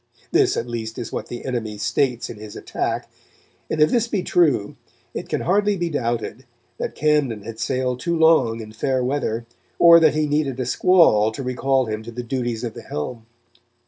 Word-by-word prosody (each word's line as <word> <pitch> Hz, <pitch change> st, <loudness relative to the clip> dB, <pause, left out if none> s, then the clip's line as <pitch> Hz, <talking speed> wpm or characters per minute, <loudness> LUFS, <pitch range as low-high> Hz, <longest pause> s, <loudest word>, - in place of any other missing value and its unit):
This, -, -, +3 dB
at -, -, -1 dB
least, 115 Hz, -2 st, -5 dB
is 120 Hz, -3 st, -5 dB
what -, -, -4 dB
the 120 Hz, -, -7 dB
enemy 115 Hz, -5 st, -3 dB
states 120 Hz, +4 st, 0 dB
in -, -, -8 dB
his 105 Hz, 0 st, -10 dB
attack, -, -, -3 dB, 0.6 s
and 155 Hz, -, -2 dB
if 150 Hz, 0 st, +5 dB
this 235 Hz, -1 st, +2 dB
be 205 Hz, -5 st, -1 dB
true, 145 Hz, -12 st, +2 dB, 0.4 s
it -, -, -6 dB
can -, -, -1 dB
hardly 205 Hz, +3 st, +2 dB
be 175 Hz, -1 st, -2 dB
doubled 120 Hz, -5 st, -2 dB, 0.4 s
that -, -, -4 dB
Camden 145 Hz, -9 st, +1 dB
had 115 Hz, +1 st, -8 dB
sailed 125 Hz, -1 st, -1 dB
too 170 Hz, +4 st, -1 dB
long 160 Hz, -9 st, +4 dB
in 110 Hz, -1 st, -9 dB
fair 130 Hz, +3 st, -1 dB
weather, 125 Hz, -4 st, -1 dB, 0.3 s
or 170 Hz, 0 st, +8 dB
that 160 Hz, -2 st, +4 dB
he 155 Hz, 0 st, +2 dB
needed 145 Hz, -3 st, -1 dB
a 130 Hz, -, -1 dB
squall 125 Hz, -, +4 dB
to 135 Hz, -, -5 dB
recall 130 Hz, +1 st, +1 dB
him 110 Hz, -1 st, -4 dB
to 115 Hz, +2 st, -9 dB
the 120 Hz, +1 st, -6 dB
duties 120 Hz, -2 st, -3 dB
of 115 Hz, -2 st, -3 dB
the -, -, -9 dB
helm. 110 Hz, +10 st, -6 dB
125 Hz, 195 wpm, -22 LUFS, 115-150 Hz, 0.6 s, or